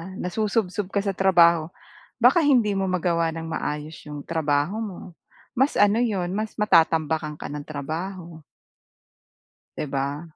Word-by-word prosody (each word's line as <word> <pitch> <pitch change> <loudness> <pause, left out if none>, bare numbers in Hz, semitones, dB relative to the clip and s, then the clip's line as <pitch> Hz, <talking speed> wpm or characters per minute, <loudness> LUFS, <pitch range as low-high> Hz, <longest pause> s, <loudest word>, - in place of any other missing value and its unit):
nasusubsob 200 +1 -1
ka 200 - +1
sa 200 - 0
trabaho, 170 -4 +4 0.5
baka 250 +8 +5
hindi 245 -8 +3
mo 195 0 0
magawa 170 -2 +1
nang 165 0 -6
maayos 150 0 -4
yung 150 -1 -7
trabaho 155 +4 0
mo. 200 -5 -6 0.6
Mas 270 +4 +1
ano 205 +2 +4
'yon, 195 -7 -1
mas 215 +1 -4
matatambakan 160 -6 +2
ka - - -7
ng 145 -1 -6
trabaho. 160 +3 -6 1.4
'Di - - -2
ba? 140 +3 -3
175 Hz, 135 wpm, -24 LUFS, 155-205 Hz, 1.4 s, baka